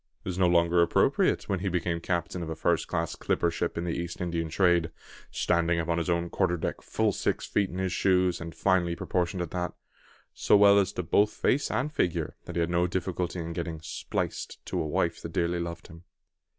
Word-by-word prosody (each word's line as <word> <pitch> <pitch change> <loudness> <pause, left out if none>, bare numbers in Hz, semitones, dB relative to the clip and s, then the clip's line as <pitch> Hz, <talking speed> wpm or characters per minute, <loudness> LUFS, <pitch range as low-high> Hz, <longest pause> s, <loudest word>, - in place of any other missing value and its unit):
It - - -3
was 90 0 -3
no 90 - +5
longer 85 0 +4
appropriate 85 - +2
when 95 - -1
he 100 +1 -1
became 90 -1 -1
the - - -9
captain 85 0 -2
of 80 - -5
a 80 - -3
first - - +1
class 80 0 -2
clipper 85 - 0
ship 85 +1 -2
in 85 - -1
the 85 - -2
East 85 -1 -4
Indian 85 -2 -2
trade, 85 0 +3 0.4
standing 85 -1 +1
upon 85 0 0
his 85 - -2
own 85 0 0
quarter 90 -2 +1
deck - - -3
full - - 0
six - - -1
feet 100 -2 0
in 90 - -7
his 95 -1 -1
shoes, 90 -2 +2
and 85 0 -7
finely 90 -3 +2
proportioned 90 +1 -1
at 85 - -7
that, 90 -1 -2 0.6
so - - +4
well 100 0 +7
as 95 -2 +1
to 90 - -3
both 105 +6 +3
face 145 - +1
and 150 +4 -1
figure, 85 - -1
that 85 - -7
he 85 - +1
had 85 +1 0
no 90 0 +2
difficulty 90 0 -2
in 85 -1 -4
getting 85 -2 -4
"spliced" 80 - -4
to - - -2
a 80 - -2
wife - - 0
that - - -7
dearly 85 0 0
loved 85 0 -5
him. 85 -1 -13
85 Hz, 220 wpm, -28 LUFS, 85-90 Hz, 0.6 s, well